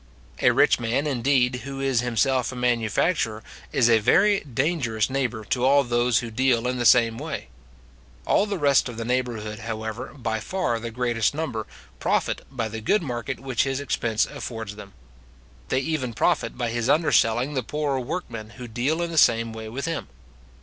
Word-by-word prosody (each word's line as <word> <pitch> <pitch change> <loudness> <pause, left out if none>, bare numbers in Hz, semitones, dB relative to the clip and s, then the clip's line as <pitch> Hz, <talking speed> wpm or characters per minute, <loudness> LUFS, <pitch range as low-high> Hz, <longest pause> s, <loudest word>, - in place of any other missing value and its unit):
A - - +6
rich - - +4
man, 120 +5 0
indeed, 130 -2 +2
who 135 +2 -7
is 135 -3 +1
himself 125 +1 +1
a - - -8
manufacturer, 115 - 0 0.3
is 120 - +3
a 115 -1 +5
very 200 - +4
dangerous 130 -5 -1
neighbour 125 -5 -2
to 125 - +1
all 140 +2 +5
those 120 -1 +2
who 115 - -7
deal 125 0 +2
in 125 0 -2
the 120 - +4
same 115 -1 +4
way. 155 0 -5 0.8
All 205 - +3
the 200 -1 -2
rest 140 -5 +3
of 120 - -8
the 115 - -4
neighbourhood, 115 -4 -2
however, 110 +1 -5
by 115 -4 -2
far 120 - -1
the 115 +1 -5
greatest 120 +1 0
number, 130 -9 -3 0.3
profit - - 0
by 120 -4 -3
the 110 +1 -6
good 190 - +2
market 125 -1 -4
which 130 -2 -1
his 135 0 -1
expense 115 -5 0
affords 110 -4 -6
them. 100 -2 -11 0.8
They 130 - +1
even 135 -5 -2
profit 170 +6 +1
by 120 -3 -1
his 120 +1 -1
underselling 140 -4 +3
the 130 - 0
poorer 145 +2 -2
workmen 120 -5 -5
who 125 -1 -7
deal 130 +9 -1
in 170 - -3
the 165 - +3
same 115 -2 +3
way 110 0 -7
with 130 +6 -4
him. 165 - -3
125 Hz, 180 wpm, -24 LUFS, 115-140 Hz, 0.8 s, A